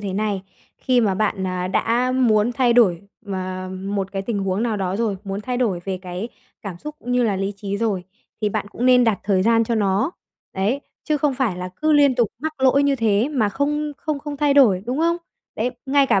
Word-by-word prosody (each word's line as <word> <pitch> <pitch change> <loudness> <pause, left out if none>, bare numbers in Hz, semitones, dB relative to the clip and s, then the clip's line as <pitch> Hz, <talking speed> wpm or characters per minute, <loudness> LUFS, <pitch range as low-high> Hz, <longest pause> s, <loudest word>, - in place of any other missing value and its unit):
thế 200 -2 -4
này. 205 -1 -1 0.4
Khi 255 -2 +2
mà 205 -4 +2
bạn, 200 -1 0
à, 185 0 -2
đã 240 +6 +1
muốn 235 -3 +3
thay 245 -1 +3
đổi 205 -8 +4 0.3
m 200 - -5 0.6
một 195 0 -2
cái 195 - -2
tình 215 0 -2
huống 195 +2 -1
nào 230 -3 0
đó 190 -1 -2
rồi, 215 -3 0
muốn 195 +1 -4
thay 250 +3 -3
đổi 220 -8 0
về 190 -1 -3
cái 180 +4 -5 0.3
cảm 190 -5 -6
xúc 300 +9 -7
cũng 245 +1 -4
như 250 - +3
là 210 -5 +1
lý 195 +1 -2
trí 200 0 -4
rồi 200 -4 -1 0.4
thì 210 - +1
bạn 205 0 -2
cũng 240 +4 -2
nên 250 -1 +6
đặt 225 -4 +2
thời 190 -2 +2
gian 230 +2 +3
cho 230 +1 -1
nó. 205 - +1 0.4
Đấy, 205 +9 0 0.2
chứ 305 - +1
không 290 -1 +1
phải 250 -8 0
là 180 0 -4
cứ 310 0 +3
liên 285 -3 +5
tục 240 -4 +2
mắc 315 +4 -3
lỗi 265 +1 +4
như 280 -1 +2
thế 220 0 +2
mà 255 -9 +1
không 295 +6 -1
không 305 0 -3
không 290 0 -6
thay 290 -1 +2
đổi, 215 -10 +5
đúng 255 +3 -2
không? 335 +1 +2 0.4
Đấy, 235 +3 0 0.2
ngay 275 0 +4
cả 195 - +3
225 Hz, 235 wpm, -22 LUFS, 195-260 Hz, 0.6 s, nên